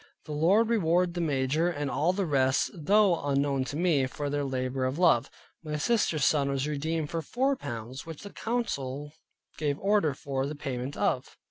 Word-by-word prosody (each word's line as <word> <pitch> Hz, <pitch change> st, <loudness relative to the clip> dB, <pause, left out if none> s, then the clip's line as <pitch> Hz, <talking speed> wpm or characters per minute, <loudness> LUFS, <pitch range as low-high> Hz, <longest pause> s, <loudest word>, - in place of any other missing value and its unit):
The 155 Hz, -, -8 dB
Lord 180 Hz, +10 st, +3 dB
reward 180 Hz, -5 st, +2 dB
the 175 Hz, -, -2 dB
major, 150 Hz, +2 st, +1 dB
and 145 Hz, -4 st, -3 dB
all 165 Hz, +4 st, +2 dB
the 190 Hz, +1 st, -1 dB
rest, 135 Hz, -4 st, +2 dB
though 190 Hz, +1 st, +3 dB
unknown 140 Hz, -1 st, +1 dB
to 140 Hz, -, -5 dB
me, 155 Hz, -5 st, +2 dB
for 145 Hz, +2 st, -4 dB
their 145 Hz, 0 st, 0 dB
labor 130 Hz, -1 st, -2 dB
of 130 Hz, +3 st, -2 dB
Love. 170 Hz, -10 st, +4 dB, 0.3 s
My 150 Hz, -1 st, -3 dB
sister's 165 Hz, -4 st, +1 dB
son 140 Hz, -2 st, +3 dB
was 140 Hz, +1 st, -1 dB
redeemed 155 Hz, +1 st, -2 dB
for 165 Hz, -, -1 dB
four 265 Hz, -, 0 dB
pounds, 120 Hz, -, -6 dB
which 165 Hz, 0 st, -9 dB
the 205 Hz, -, -8 dB
council 145 Hz, -, -3 dB, 0.5 s
gave 145 Hz, -2 st, 0 dB
order 195 Hz, -7 st, +2 dB
for 135 Hz, 0 st, -2 dB
the 150 Hz, -, -5 dB
payment 135 Hz, -1 st, -4 dB
of. 130 Hz, -, -1 dB
150 Hz, 180 wpm, -28 LUFS, 135-175 Hz, 0.5 s, Love